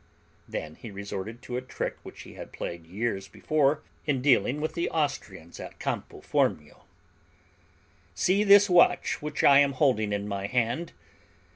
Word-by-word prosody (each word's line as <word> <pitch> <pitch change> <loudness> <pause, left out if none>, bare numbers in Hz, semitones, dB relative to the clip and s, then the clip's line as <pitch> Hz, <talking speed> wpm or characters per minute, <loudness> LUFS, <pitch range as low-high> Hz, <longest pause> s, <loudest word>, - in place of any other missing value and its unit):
Then 80 -1 -5
he 115 - -9
resorted 100 +3 -6
to 125 - -4
a - - -2
trick 130 - -4
which - - -11
he - - -12
had - - -10
played 85 -1 -6
years 100 +1 -3
before 150 -1 0 0.2
in 140 -3 +1
dealing 135 +1 +3
with 155 +1 -2
the 170 - -1
Austrians 105 - -3
at - - -9
Campo - - -4
Formio. 75 -1 -1 1.3
"See 190 - +2
this 200 0 +7
watch 175 -1 +3
which 150 0 -3
I 140 0 +7
am 140 -1 +3
holding 125 -7 +2
in 100 0 -2
my 100 -1 -3
hand. 125 +8 -1
125 Hz, 155 wpm, -27 LUFS, 100-150 Hz, 1.3 s, this